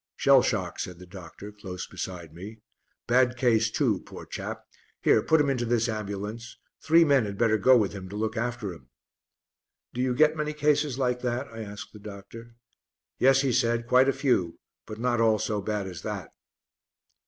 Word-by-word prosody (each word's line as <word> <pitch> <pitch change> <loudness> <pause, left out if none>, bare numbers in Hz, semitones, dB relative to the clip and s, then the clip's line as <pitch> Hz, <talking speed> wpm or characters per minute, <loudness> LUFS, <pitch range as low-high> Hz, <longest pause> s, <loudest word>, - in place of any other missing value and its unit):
"Shell - - +5
shock," - - -2
said 90 -2 -5
the 90 - -12
doctor, 95 +2 -11
close 95 -4 -7
beside 85 -4 -7
me; 105 +6 -10 0.4
"bad 125 0 +3
case 115 -3 +3
too, 110 -5 +1
poor - - -11
chap! - - -6 0.4
Here, - - +4
put 160 - +3
him 145 - +2
into 130 -3 0
this 120 0 +1
ambulance; 110 +1 -5 0.2
three 165 +1 +5
men 140 -6 +3
had 100 -1 -6
better 110 -1 +2
go 130 +5 +6
with 105 -4 0
him 95 -2 -8
to 100 - -8
look 110 +1 -2
after 120 -4 -3
him." 65 -7 -16 1.0
"Do 125 - -2
you 130 -1 0
get 155 +3 +4
many 150 0 -2
cases 150 -2 +1
like 125 -2 0
that?" 125 +2 -2
I 115 0 -8
asked 105 -1 -8
the 105 - -11
doctor. 105 +3 -11 0.6
"Yes," 135 +1 +5
he 135 -3 0
said, 115 +1 +1
"quite 130 +3 +4
a - - +4
few, 125 - 0 0.3
but 110 - -7
not 120 0 0
all 110 -1 +4
so 105 -1 -2
bad 105 0 -2
as 90 -2 -7
that." 100 -4 -5
115 Hz, 190 wpm, -27 LUFS, 100-125 Hz, 1.0 s, go